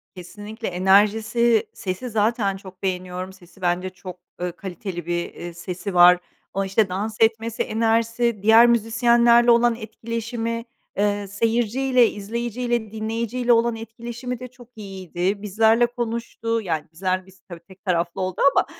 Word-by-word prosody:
Kesinlikle. 205 Hz, +5 st, -8 dB
Enerjisi, 215 Hz, +5 st, +3 dB
sesi 190 Hz, +7 st, -5 dB
zaten 215 Hz, -2 st, 0 dB
çok 190 Hz, -1 st, -14 dB
beğeniyorum, 185 Hz, 0 st, -3 dB
sesi 185 Hz, 0 st, -19 dB
bence 180 Hz, +1 st, 0 dB
çok, 185 Hz, -1 st, -10 dB, 0.2 s
eee, 180 Hz, 0 st, -1 dB
kaliteli 180 Hz, -1 st, -7 dB
bir, 175 Hz, 0 st, -3 dB
eee, 175 Hz, 0 st, -8 dB
sesi 180 Hz, +2 st, -6 dB
var. 175 Hz, 0 st, +7 dB, 0.3 s
O, 195 Hz, -, 0 dB
işte, 195 Hz, +1 st, +1 dB
dans 210 Hz, +4 st, -3 dB
etmesi, 225 Hz, 0 st, +1 dB
enerjisi, 230 Hz, 0 st, 0 dB
diğer 225 Hz, +2 st, +7 dB
müzisyenlerle 235 Hz, +1 st, +4 dB
olan 235 Hz, 0 st, +4 dB
etkileşimi, 230 Hz, 0 st, -4 dB, 0.3 s
eee, 205 Hz, 0 st, 0 dB
seyirciyle, 235 Hz, +4 st, +2 dB
izleyiciyle, 235 Hz, +2 st, -3 dB
dinleyiciyle 230 Hz, +3 st, 0 dB
olan 230 Hz, 0 st, +2 dB
etkileşimi 235 Hz, +2 st, -7 dB
de 250 Hz, -, -7 dB
çok 245 Hz, -1 st, -17 dB
iyiydi. 190 Hz, -1 st, -3 dB
Bizlerle 220 Hz, +3 st, +3 dB
konuştu 230 Hz, -1 st, -3 dB
yani 160 Hz, -6 st, -2 dB
bizler 185 Hz, +2 st, -1 dB
biz 190 Hz, 0 st, -19 dB
tabii 175 Hz, -2 st, -8 dB
tek 190 Hz, +1 st, -18 dB
taraflı 170 Hz, -2 st, -1 dB
oldu 185 Hz, -1 st, -3 dB
ama, -, -, +2 dB
215 Hz, 135 wpm, -23 LUFS, 185-235 Hz, 0.3 s, var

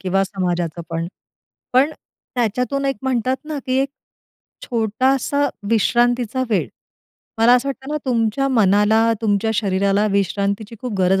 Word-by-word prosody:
किंवा 195 Hz, +1 st, +1 dB
समाजाचं 175 Hz, -4 st, -2 dB
पण. 165 Hz, 0 st, -2 dB, 0.7 s
पण 265 Hz, +4 st, +4 dB, 0.4 s
त्याच्यातून 250 Hz, +4 st, 0 dB
एक 270 Hz, -1 st, 0 dB
म्हणतात 255 Hz, -1 st, 0 dB
ना, 305 Hz, -1 st, -4 dB
की 255 Hz, 0 st, +1 dB
एक 275 Hz, -, 0 dB, 0.8 s
छोटासा 260 Hz, +5 st, +1 dB, 0.2 s
विश्रांतीचा 240 Hz, +2 st, +2 dB
वेळ, 205 Hz, -, +1 dB, 0.7 s
मला 230 Hz, +2 st, +6 dB
असं 250 Hz, +3 st, +1 dB
वाटतं 270 Hz, +1 st, -5 dB
ना, -, -, 0 dB
तुमच्या 235 Hz, +2 st, +1 dB
मनाला, 220 Hz, -1 st, +4 dB
तुमच्या 215 Hz, 0 st, +1 dB
शरीराला 200 Hz, 0 st, +1 dB
विश्रांतीची 200 Hz, +2 st, -1 dB
खूप 250 Hz, -2 st, -4 dB
गरज 190 Hz, +1 st, +3 dB
225 Hz, 130 wpm, -20 LUFS, 200-255 Hz, 0.8 s, मला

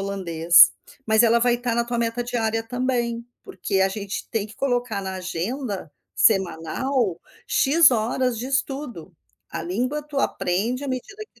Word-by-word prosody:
holandês. 175 Hz, -4 st, +5 dB, 0.4 s
Mas 220 Hz, +1 st, +4 dB
ela 235 Hz, 0 st, +4 dB
vai 240 Hz, 0 st, +3 dB
estar 240 Hz, -1 st, -2 dB
na 235 Hz, 0 st, +1 dB
tua 240 Hz, 0 st, -3 dB
meta 230 Hz, +1 st, -1 dB
diária 225 Hz, -2 st, -1 dB
também, 240 Hz, -1 st, -2 dB, 0.2 s
porque 195 Hz, -2 st, -2 dB
a 190 Hz, -, +4 dB
gente 200 Hz, 0 st, -5 dB
tem 220 Hz, -3 st, -1 dB
que 215 Hz, -, -14 dB
colocar 245 Hz, -6 st, -1 dB
na 190 Hz, 0 st, -4 dB
agenda 190 Hz, -, -4 dB, 0.2 s
semanal 195 Hz, -, +1 dB, 0.3 s
x 315 Hz, +4 st, +5 dB
horas 240 Hz, +1 st, 0 dB
de 245 Hz, -, -4 dB
estudo. 270 Hz, -, -3 dB, 0.4 s
A -, -, -4 dB
língua 250 Hz, +12 st, -2 dB
tu 290 Hz, -1 st, -5 dB
aprende 230 Hz, +3 st, -1 dB
à -, -, -4 dB
medida 265 Hz, -, -5 dB
que 235 Hz, -, -27 dB
235 Hz, 160 wpm, -23 LUFS, 195-250 Hz, 0.4 s, holandês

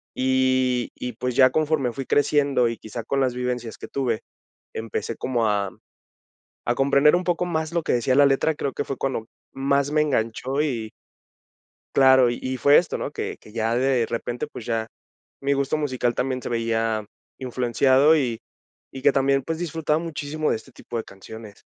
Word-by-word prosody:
Y 130 Hz, -1 st, +1 dB
y, 125 Hz, 0 st, -5 dB
pues, 125 Hz, +2 st, -3 dB
ya 130 Hz, 0 st, +7 dB
conforme 155 Hz, -5 st, +1 dB
fui 135 Hz, -2 st, -5 dB
creciendo 140 Hz, -4 st, +2 dB
y 115 Hz, -, -5 dB
quizá 110 Hz, +1 st, -7 dB
con 140 Hz, +4 st, -1 dB
las 130 Hz, -2 st, +1 dB
vivencias 125 Hz, -2 st, -3 dB
que -, -, -8 dB
tuve, 125 Hz, -5 st, -1 dB, 0.5 s
empecé 115 Hz, 0 st, -4 dB
como 120 Hz, -3 st, 0 dB
a 100 Hz, -2 st, 0 dB, 1.0 s
a 120 Hz, -, +2 dB
comprender 140 Hz, +3 st, +4 dB
un 180 Hz, -, -2 dB
poco 175 Hz, 0 st, 0 dB
más 160 Hz, -2 st, -2 dB
lo 170 Hz, -1 st, 0 dB
que -, -, -1 dB
decía 125 Hz, +2 st, +1 dB
la 145 Hz, +1 st, +6 dB
letra, 140 Hz, +3 st, +2 dB
creo 140 Hz, -2 st, -3 dB
que -, -, -3 dB
fue 135 Hz, -, -4 dB
cuando 130 Hz, -5 st, -2 dB, 0.3 s
más 140 Hz, +1 st, +1 dB
me 150 Hz, 0 st, +3 dB
enganchó, 130 Hz, +1 st, -1 dB
y 115 Hz, -7 st, -3 dB, 1.0 s
claro, 130 Hz, -2 st, +6 dB
y 120 Hz, -, -5 dB
y 130 Hz, 0 st, -3 dB
fue 145 Hz, +3 st, +6 dB
esto, 175 Hz, -, +1 dB
¿no?, -, -, -4 dB
que -, -, -5 dB
que 105 Hz, -, -17 dB
ya 115 Hz, +1 st, 0 dB
de 125 Hz, -2 st, +2 dB
repente, 120 Hz, +4 st, -3 dB
pues, 120 Hz, -, -9 dB
ya 115 Hz, -1 st, -1 dB, 0.5 s
mi 140 Hz, +1 st, +1 dB
gusto 140 Hz, +2 st, 0 dB
musical 130 Hz, -5 st, -1 dB
también, 130 Hz, 0 st, -1 dB
se -, -, -5 dB
veía 115 Hz, -2 st, 0 dB, 0.3 s
influenciado 130 Hz, +4 st, +3 dB
y 120 Hz, -6 st, -1 dB, 0.5 s
y 135 Hz, -, -6 dB
que 145 Hz, -, +6 dB
también, 135 Hz, 0 st, +2 dB
pues, 165 Hz, +2 st, -3 dB
disfrutaba 160 Hz, -2 st, -1 dB
muchísimo 155 Hz, -2 st, -3 dB
de -, -, +2 dB
este 120 Hz, +4 st, -16 dB
tipo 120 Hz, -, -7 dB
de 115 Hz, -, -2 dB
canciones. 105 Hz, +2 st, -12 dB
130 Hz, 185 wpm, -24 LUFS, 120-140 Hz, 1.0 s, ya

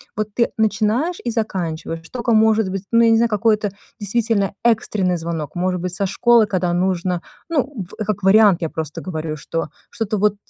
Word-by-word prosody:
Вот 215 Hz, 0 st, -2 dB
ты 235 Hz, -, +2 dB
начинаешь 220 Hz, +9 st, +1 dB
и 240 Hz, -, -1 dB
заканчиваешь. 170 Hz, -7 st, -3 dB
Что, 245 Hz, +8 st, -6 dB
ко 235 Hz, -1 st, +1 dB
может 220 Hz, -2 st, +4 dB
быть, 190 Hz, 0 st, -4 dB
ну, 230 Hz, 0 st, +5 dB
я 230 Hz, -, +5 dB
не 225 Hz, -, +5 dB
знаю, 235 Hz, +1 st, +3 dB
какое-то 210 Hz, -1 st, +1 dB, 0.3 s
действительно 210 Hz, -1 st, 0 dB
экстренный 210 Hz, -6 st, +1 dB
звонок. 165 Hz, -3 st, -5 dB
Может 180 Hz, 0 st, -1 dB
быть, 180 Hz, -1 st, -4 dB
со 200 Hz, 0 st, -1 dB
школы, 235 Hz, +3 st, +4 dB
когда 185 Hz, -3 st, -1 dB
нужно 180 Hz, 0 st, 0 dB, 0.3 s
ну, 275 Hz, -, -1 dB
в 215 Hz, -, -3 dB
как 210 Hz, -1 st, -2 dB
вариант, 200 Hz, -1 st, +5 dB
я 165 Hz, -, -1 dB
просто 155 Hz, -1 st, -5 dB
говорю, 160 Hz, -3 st, -4 dB
что, 165 Hz, +1 st, -4 dB, 0.2 s
что-то 220 Hz, -1 st, -2 dB
вот, 210 Hz, 0 st, +2 dB
205 Hz, 190 wpm, -20 LUFS, 180-225 Hz, 0.3 s, ну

